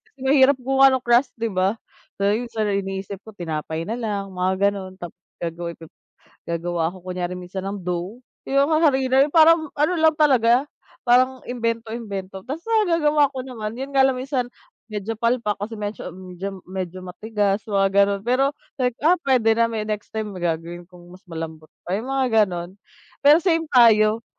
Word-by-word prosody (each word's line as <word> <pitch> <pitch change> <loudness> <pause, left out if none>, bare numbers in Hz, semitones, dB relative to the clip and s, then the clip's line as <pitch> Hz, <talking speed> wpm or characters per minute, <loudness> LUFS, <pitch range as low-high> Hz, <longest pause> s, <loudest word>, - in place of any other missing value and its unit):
Kasi 275 - -34
mahirap 270 0 +5
gumawa 270 +1 +5
ng 260 - -1
crust, 240 +2 +3
'di 230 -1 -2
ba? 190 +2 +1 0.4
Pero 205 +5 0
sa 220 - 0
iniisip 195 -1 -3
ko 220 - -11
tinapay 160 -2 -4
na 230 +6 -4
lang, 205 -4 -3
mga 190 +2 +1
gano'n. 190 -2 -7
Tap 175 -3 -8 0.3
gagawa 170 0 -4
p 165 - -12 0.7
gagawa 170 0 -2
ako 185 - -12 0.2
kunyari 180 0 -3
minsan 180 +1 -6
ng 200 - -4
dough, 180 +5 -3 0.3
yung 275 +3 +3
ha 310 - +3
harina 265 -1 +2
na 290 - +3
parang 320 0 +5
ano 305 +5 +2
lang 315 -1 +4
talaga, 255 -3 +4 0.4
parang 255 +1 +3
imbento-imbento. 225 -5 -4
Tapos 300 +6 -5
nagagawa 335 -10 +3
ko 260 -2 -6
naman, 225 -3 -6
yun 270 +2 -6
nga 270 - +5
lang 265 -1 +3
minsan, 255 -1 -2 0.4
medyo 210 +1 -4
palpak, 230 -2 0
kasi 220 +2 -5
medyo 210 0 -5
medyo 185 +1 -7 0.2
medyo 185 -1 -5
matigas, 205 +2 -1
mga 195 -1 +2 0.2
ganun. 200 0 +1
Pero, 255 +3 +2 0.3
like, 250 -1 0
ah, 340 - +7
puwede 245 -6 +3
na 230 0 +2
may 220 -2 -3
next 210 -1 -4
time 215 -2 -4
may 185 - -8
gagawin 170 +1 -3
kong 175 -1 -15
mas 185 - -15
malambot 160 -1 -7 0.2
pa, 180 - -3
yung 240 +5 -6
mga 255 -5 +3
gano'n? 175 -2 -5 0.5
Pero 290 +3 +7
same 330 -3 0
tayo. 225 -2 +5
220 Hz, 175 wpm, -22 LUFS, 190-265 Hz, 0.7 s, ah